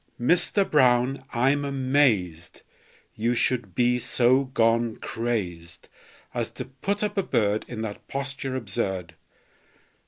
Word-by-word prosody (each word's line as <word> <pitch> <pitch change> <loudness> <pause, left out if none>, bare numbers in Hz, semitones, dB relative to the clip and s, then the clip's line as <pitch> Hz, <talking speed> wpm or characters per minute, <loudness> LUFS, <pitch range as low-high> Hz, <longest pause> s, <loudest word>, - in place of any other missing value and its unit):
Mister 180 - +2
Brown, 130 -2 +2
I'm 135 +4 +2
amazed 130 - 0 0.5
You 115 +3 0
should 115 -7 0
be 125 0 +2
so 125 +2 +3
gone 115 -2 +1
crazed 90 -8 -4 0.4
As - - -2
to - - -6
put 195 +11 -3
up 205 -1 -1
a - - +4
bird 105 - 0
In 115 -2 -5
that 105 -2 -7
posture 135 -1 -4
absurd! 95 -7 -3
125 Hz, 120 wpm, -25 LUFS, 110-135 Hz, 0.5 s, a